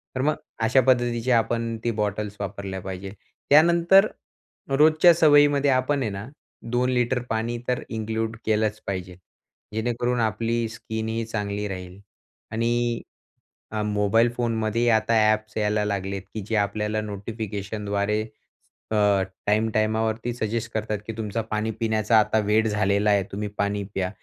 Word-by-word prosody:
तर 130 - -1
मग 150 +2 +2 0.3
अशा 125 +4 +4
पद्धतीचे 120 -1 +2
आपण 115 0 +1
ती 120 - +1
बॉटल्स 105 0 -2
वापरल्या 100 -1 -5
पाहिजे. 95 +1 -6 0.4
त्यानंतर 170 +6 +6 0.6
रोजच्या 155 +5 +6
सवयीमध्ये 145 -3 +5
आपण 130 +2 +1
आहे 110 - 0
ना, 100 +4 -6 0.4
2 125 +1 +1
लिटर 125 0 +1
पाणी 115 +2 -1
तर 125 -1 0
इन्क्लूड 110 0 -3
केलंच 110 -1 +1
पाहिजे. 90 -2 -4 0.6
जेणेकरून 120 +2 -1
आपली 115 +1 0
स्किन 110 0 -5
ही 115 0 -2
चांगली 105 -2 -3
राहील 95 -1 -7 0.5
आणि 120 +1 0 0.7
अ, 110 -1 -2
मोबाईल 105 +2 +2
फोनमध्ये 115 -1 0
आता 110 0 +2 0.2
ॲप्स 110 0 -3
यायला 105 0 +1
लागलेत, 100 -1 -2
की 110 - -4
जे 110 - -1
आपल्याला 105 +1 0
नोटिफिकेशनद्वारे 105 0 -3 0.7
अ, - - +1 0.5
टाइम-टायमावरती 110 +2 +1
सजेस्ट 115 0 -3
करतात, 110 -1 -2
की 115 - -4
तुमचा 110 0 -2
पाणी 110 +1 -1
पिण्याचा 110 0 +3
आता 110 +1 +2
वेळ 110 +2 +3
झालेला 105 0 +1
आहे, 100 -1 +3
तुम्ही 105 +2 -3
पाणी 100 0 0
प्या. 95 -1 -1
110 Hz, 135 wpm, -24 LUFS, 105-120 Hz, 0.7 s, त्यानंतर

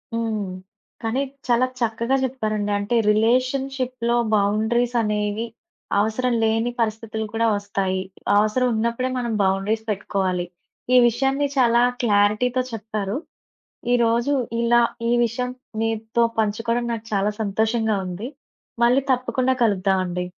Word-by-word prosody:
హ్మ్. 220 -3 -1 0.6
కానీ 230 +3 -1 0.3
చాలా 245 +1 +3
చక్కగా 235 +2 0
చెప్పారండి. 215 -5 -2
అంటే 205 +4 -1
రిలేషన్‌షిప్‌లో 255 +2 +1 0.2
బౌండరీస్ 220 +4 +1
అనేవి 210 +1 -1 0.5
అవసరం 220 +4 +1
లేని 225 +2 +1
పరిస్థితులు 220 -1 -2
కూడా 230 0 +2
వస్తాయి. 195 -2 -2 0.4
అవసరం 215 +5 +2
ఉన్నప్పుడే 235 +3 0
మనం 240 -2 -2
బౌండరీస్ 195 +3 0
పెట్టుకోవాలి. 190 -3 -1 0.5
ఈ - - +8
విషయాన్ని 270 +4 +1
చాలా 240 -2 +4 0.2
క్లారిటీతో 215 +4 +2
చెప్పారు. 215 -1 -3 0.8
ఈరోజు 235 +2 +2 0.3
ఇలా 240 0 +4 0.3
ఈ - - +3
విషయం 250 +2 -2 0.3
మీతో 225 +1 0 0.2
పంచుకోవడం 230 +3 0
నాకు 225 -1 -5
చాలా 200 +1 +2
సంతోషంగా 220 +1 0
ఉంది. 185 +6 -5 0.6
మళ్ళీ 250 +3 +4
తప్పకుండా 255 +1 0
కలుద్దాం 195 -3 +2
అండి. 180 0 -3
225 Hz, 110 wpm, -22 LUFS, 210-240 Hz, 0.8 s, ఈ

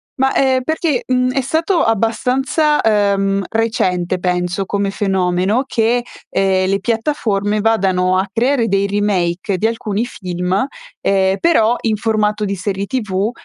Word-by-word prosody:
Ma, 265 -1 +1
ehm, 260 -1 +2
perché, 315 -3 -1
mhmm, 255 0 +1
è 270 - 0
stato 320 +7 0
abbastanza, 255 +7 +1
ehm, 200 -2 +1
recente 185 -6 0
penso 180 +1 -1
come 200 0 -1
fenomeno 190 +3 0
che, 240 -1 +1 0.3
ehm, 190 -1 +1
le 195 - +1
piattaforme 215 -3 -1
vadano 185 -4 +2
a 195 - -1
creare 240 +3 +1
dei 195 0 +1
remake 195 -2 0
di 215 - -1
alcuni 225 -1 -1
film, 180 0 -2 0.3
ehm, 195 0 +2
però 240 -9 +3
in 220 -2 0
formato 210 -1 0
di 200 - -2
serie 195 +1 -3
TV 210 -3 -1
210 Hz, 140 wpm, -17 LUFS, 190-240 Hz, 0.3 s, però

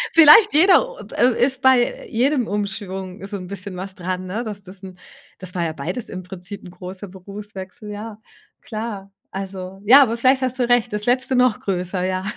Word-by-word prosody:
Vielleicht 330 +7 +8
jeder 370 +10 +5
oh, - - -13 0.2
äh, 245 -1 +3
ist 265 0 -4
bei 260 -2 +3
jedem 250 +1 +1
Umschwung 195 -2 -4
so 200 0 -5
'n 185 - -8
bisschen 195 0 -7
was 190 +1 -5
dran, 185 0 -4
ne? 205 +6 -3
Dass 210 -3 -7
das 185 0 -13
'n 185 -2 -10 0.4
das 185 -1 -9
war 175 - -1
ja 160 -1 -2
beides 160 - -5
im 185 -1 -6
Prinzip 185 +2 -9
'n 180 - -10
großer 185 +2 -8
Berufswechsel, 195 +2 -9
ja. 210 +1 -7 0.4
Klar, 215 -3 -6 0.2
also, 190 -1 -7
ja, 265 +7 +9
aber 235 -4 +2
vielleicht 260 +2 +3
hast 255 0 -2
du 245 -2 +1
recht, 245 -1 +2
das 210 0 -3
letzte 255 +1 +1
noch 250 -3 +3
größer, 185 -1 -2
ja. 185 0 -1
205 Hz, 195 wpm, -21 LUFS, 185-245 Hz, 0.4 s, ja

